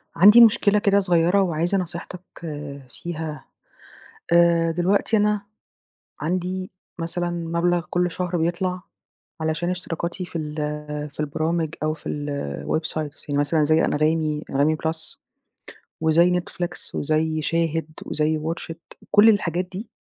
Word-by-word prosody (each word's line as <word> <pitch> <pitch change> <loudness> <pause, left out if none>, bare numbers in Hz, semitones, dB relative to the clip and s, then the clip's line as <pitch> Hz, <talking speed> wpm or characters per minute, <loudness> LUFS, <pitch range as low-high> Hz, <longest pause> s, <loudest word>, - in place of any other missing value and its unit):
عندي 210 +7 +8
مشكلة 210 -2 +5
كده 200 -1 +3
صغيّرة 180 0 +3
وعايزة 175 +1 +1
نصيحتك 175 0 -5 0.7
فيها، 155 0 -6 0.9
آآ، 170 -1 +5
دلوقتي 185 +6 +1
أنا 210 -1 +2 0.8
عندي 185 +3 -2 0.3
مثلًا 175 +1 -2
مبلغ 170 0 0
كلّ 180 0 +1
شهر 180 +1 -2
بيطلع، 180 +2 -1 0.6
علشان 160 +2 -1
اشتراكاتي 180 0 -4
في 175 - -6
ال 150 -1 -5 0.5
في 145 - -24
البرامج 160 +2 -1
أو 155 0 +1
في 155 - -8 0.6
الwebsites 155 - -3
يعني 145 0 +1
مثلًا 150 +2 +2
زي 155 +2 +3
أنغامي، 155 0 +1
أنغامي 145 +3 +2
بلس، 160 +1 -5 0.8
وزي 170 +3 +4
Netflix 175 0 -6
وزي 155 +1 0
شاهد، 165 0 0 0.2
وزي 155 +1 0
WATCH 160 +2 -4
IT، 165 - -20
كلّ 210 +2 +7
الحاجات 180 -4 +1
دي 190 +5 -8
170 Hz, 125 wpm, -23 LUFS, 155-180 Hz, 0.9 s, عندي